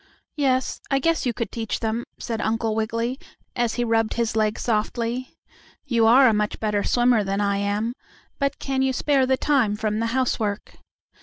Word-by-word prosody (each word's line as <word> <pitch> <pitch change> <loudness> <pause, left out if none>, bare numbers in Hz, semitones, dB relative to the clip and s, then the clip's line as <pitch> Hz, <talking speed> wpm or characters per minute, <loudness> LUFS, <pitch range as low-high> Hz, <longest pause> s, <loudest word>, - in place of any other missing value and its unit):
"Yes, 265 -3 0
I 275 - +2
guess 325 0 +1
you - - +2
could 230 - -3
teach 225 -2 -3
them," 225 +1 -2
said 225 -2 -4
Uncle 225 0 0
Wiggily, 230 +4 -2 0.4
as 240 -2 0
he 240 - 0
rubbed 225 -1 +1
his 230 -2 -1
leg 215 0 +1
softly. 235 +3 -2 0.5
"You 235 -5 +3
are 255 +3 +7
a 225 - +4
much 210 0 -1
better 210 -2 0
swimmer 240 -3 +3
than 195 0 -2
I 200 -1 +1
am; 205 +3 -1 0.5
but 280 -1 0
can 270 -1 -2
you 265 0 +1
spare 270 0 +2
the 265 0 +2
time 255 -9 +2
from 215 0 -1
the 230 - 0
housework?" 230 -4 -1
230 Hz, 180 wpm, -23 LUFS, 215-255 Hz, 0.5 s, are